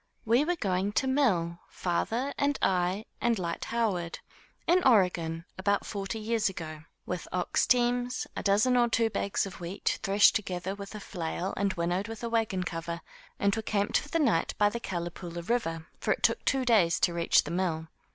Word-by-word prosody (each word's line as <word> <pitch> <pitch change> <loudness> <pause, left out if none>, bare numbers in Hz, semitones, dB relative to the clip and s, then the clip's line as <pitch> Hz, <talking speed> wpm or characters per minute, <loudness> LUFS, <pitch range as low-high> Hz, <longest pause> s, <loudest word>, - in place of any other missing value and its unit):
We 235 +5 +4
were 355 +3 0
going 195 - -1
to 265 - +1
mill, 185 -12 +1
father 230 +10 -1
and 280 0 +1
I, 185 +3 +1 0.2
and 235 -1 +2
Lyte 170 -2 -3
Howard, 195 -8 -1 0.5
in 360 +2 +4
Oregon, 175 -8 +3
about 200 +1 +1
forty 200 +1 -4
years 220 -1 0
ago, 155 -4 -7 0.2
with 180 -1 -4
ox 180 -1 +1
teams, 245 0 +2
a - - -3
dozen 215 +6 +3
or 240 -1 +4
two 225 0 +2
bags 200 -1 0
of 195 - -8
wheat, 175 +3 -2
threshed 200 +2 +5
with 195 +3 -5
a - - -5
flail 180 -1 -4
and 200 -1 0
winnowed 175 +4 -1
with 225 +1 -7
a 235 - -2
wagon 220 -5 0
cover, 170 0 -4 0.4
and 200 +1 +2
were 220 - -2
camped 205 -1 +1
for 295 - -10
the 330 - 0
night 275 - +2
by 205 0 +4
the 235 - -4
Calipoola 175 -3 -5
River; 165 -9 -1
for - - +2
it - - -10
took - - +2
two 265 -2 +1
days 200 -9 +4
to 175 - +3
reach 170 -1 +3
the 150 - -6
mill. 170 -3 -1
200 Hz, 185 wpm, -29 LUFS, 175-230 Hz, 0.5 s, threshed